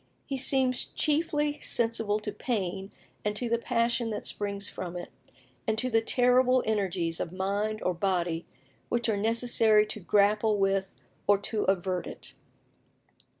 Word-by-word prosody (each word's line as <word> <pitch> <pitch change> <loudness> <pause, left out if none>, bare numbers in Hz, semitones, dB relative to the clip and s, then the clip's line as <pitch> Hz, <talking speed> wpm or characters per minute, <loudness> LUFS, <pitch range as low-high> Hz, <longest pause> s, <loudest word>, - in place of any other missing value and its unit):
He 275 - -3
seems 260 -1 +2
chiefly 295 -1 0
sensible 225 -4 0
to 210 - -4
pain 195 -3 -3 0.3
and 210 0 -1
to 240 +3 -1
the 235 0 +1
passion 235 0 0
that 210 -1 -4
springs 200 -1 -2
from 180 -1 -6
it, 175 - -7 0.6
and 220 0 +1
to 255 +3 +1
the 225 0 +4
terrible 250 +2 +3
energies 185 -6 -1
of 170 - -3
mind 200 +3 -2
or 180 - +1
body 175 -2 -1 0.4
which 240 0 0
are 220 - +2
necessary 220 0 +3
to 215 - -6
grapple 210 +2 +3
with 195 -1 0 0.3
or 205 0 +6
to 210 +1 -2
avert 185 -1 0
it." - - -8
210 Hz, 150 wpm, -28 LUFS, 195-235 Hz, 0.6 s, or